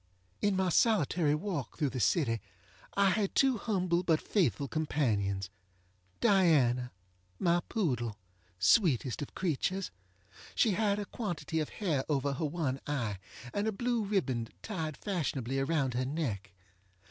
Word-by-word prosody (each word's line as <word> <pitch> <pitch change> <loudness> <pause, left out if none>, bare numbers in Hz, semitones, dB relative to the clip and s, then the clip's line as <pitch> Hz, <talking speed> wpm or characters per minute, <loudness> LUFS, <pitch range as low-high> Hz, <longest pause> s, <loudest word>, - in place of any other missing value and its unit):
In 205 -1 +2
my 190 -1 +1
solitary 170 - +3
walk 160 - -4
through, 145 -5 0
the 130 - -3
city 115 - +2 0.6
I 200 -1 +5
had 200 0 0
two 265 -4 +4
humble 185 -5 +1
but 165 -3 +2
faithful 140 - +1
companions. 105 - 0 0.7
Diana, 150 - +3 0.5
my 175 - +3
poodle! 125 - -1 0.4
sweetest 130 - +3
of 145 - -6
creatures! 185 +2 -1 0.6
She 225 - +4
had 205 +1 +1
a 205 - -3
quantity 170 -8 -3
of 155 - -2
hair 160 -10 -1
over 140 -1 +1
her 150 +4 -2
one 145 -4 -1
eye, 120 -9 -2 0.3
and 205 +1 0
a - - +2
blue 240 +2 0
ribbon 150 - 0 0.2
tied 160 -8 -4
fashionably 135 - -2
around 135 -2 +1
her 125 +1 0
neck. 125 - -3
155 Hz, 135 wpm, -31 LUFS, 130-195 Hz, 0.7 s, I